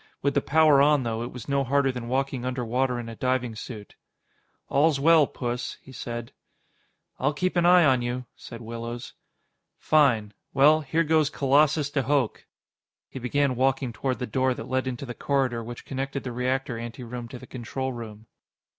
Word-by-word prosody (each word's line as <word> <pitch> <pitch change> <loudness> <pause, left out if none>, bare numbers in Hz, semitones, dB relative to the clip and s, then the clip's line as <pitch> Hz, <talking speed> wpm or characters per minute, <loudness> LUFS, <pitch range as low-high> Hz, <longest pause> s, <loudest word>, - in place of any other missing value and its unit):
With 140 0 +2
the 140 - +2
power 150 -1 +5
on, 145 -1 +4
though, 115 -1 -2
it 120 - -5
was 125 -3 -9
no 140 -1 +1
harder 135 +1 +2
than 125 -2 -6
walking 135 0 -1
underwater 125 0 -1
in 120 - -6
a 115 - -7
diving 125 -1 -1
suit. 110 -2 -8 0.7
"All's 145 0 +3
well, 155 0 +5
Puss," 120 0 -4
he 130 - -15
said. 120 -2 -6 0.9
"I'll 145 +3 +1
keep 185 +4 -1
an 175 0 +3
eye 180 -1 +7
on 130 -3 +4
you," 125 +1 -3
said 115 0 -10
Willows. 115 +1 -6 0.6
"Fine. 120 -9 +3 0.2
Well, 150 +3 +6
here 160 +3 +1
goes 155 -2 +3
Colossus 145 +1 +2
de 145 - +1
Hooch." 135 -3 0 0.6
He 130 - -7
began 130 +2 +1
walking 130 -1 +1
toward 130 +1 -2
the 125 - -3
door 130 0 0
that - - -7
led 130 0 -1
into 130 +1 -4
the 120 - -6
corridor 130 -4 0
which 120 +1 -8
connected 135 0 -4
the 125 - -4
reactor 125 0 -1
anteroom 120 +1 -7
to 125 - -9
the 125 - -11
control 130 +2 -4
room. 110 -2 -9
130 Hz, 180 wpm, -26 LUFS, 120-140 Hz, 0.9 s, eye